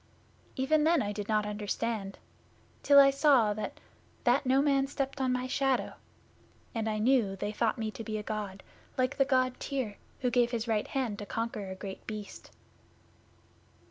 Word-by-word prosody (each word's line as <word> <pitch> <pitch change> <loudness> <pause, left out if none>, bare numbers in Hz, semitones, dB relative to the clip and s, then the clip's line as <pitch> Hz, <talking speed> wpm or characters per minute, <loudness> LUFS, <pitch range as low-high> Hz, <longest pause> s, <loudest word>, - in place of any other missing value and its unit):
'Even 300 +4 +2
then 330 +1 +4
I 205 - -2
did 205 0 -5
not 215 -1 +2
understand, 210 0 -3 0.6
till 280 -1 +7
I 275 0 +8
saw 270 -7 +4
that 215 +1 -5 0.4
that 250 +2 +3
no 265 +1 +4
man 275 -1 +3
stepped 275 0 -3
on 260 -1 +1
my 250 0 -1
shadow; 265 0 0 0.8
and 225 -1 -1
I 215 - -1
knew 240 0 +3
that 195 0 -7
they 205 +1 -2
thought 225 +2 0
me 220 -2 -2
to 225 - -7
be 215 -1 -3
a 210 - -5
God, 205 -3 -5 0.3
like 255 +2 0
the 275 - +4
God 255 -2 +1
Tyr, 255 -8 -3 0.2
who 250 -1 +1
gave 240 -1 +3
his 235 -1 -3
right 220 -2 0
hand 245 -7 -2
to 205 - -7
conquer 225 -3 -3
a 190 - -5
Great 190 0 -8
Beast. 215 -2 -7
235 Hz, 180 wpm, -30 LUFS, 210-265 Hz, 0.8 s, I